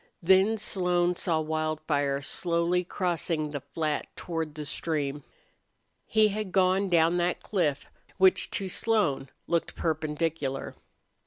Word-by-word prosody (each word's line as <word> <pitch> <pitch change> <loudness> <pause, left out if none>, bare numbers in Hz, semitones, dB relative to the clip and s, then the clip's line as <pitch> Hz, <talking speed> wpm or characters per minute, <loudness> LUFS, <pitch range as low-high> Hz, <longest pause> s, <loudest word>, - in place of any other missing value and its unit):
Then 190 +5 +4
Slone 180 -3 +1
saw 165 -2 +1
Wildfire 155 -3 -1
slowly 170 +3 +1
crossing 170 -4 -2
the 145 -2 -4
flat 155 0 -2
toward 165 -3 -4
the 150 -1 -6
stream. 145 -1 -3 0.8
He 215 -1 +4
had 210 -1 -4
gone 190 +1 +2
down 170 0 +3
that 175 0 0
cliff, 160 -9 0 0.3
which 190 -1 +4
to 195 - -2
Slone 185 - 0 0.2
looked 170 -1 -1
perpendicular. 155 -3 -2
170 Hz, 115 wpm, -28 LUFS, 155-185 Hz, 0.8 s, Then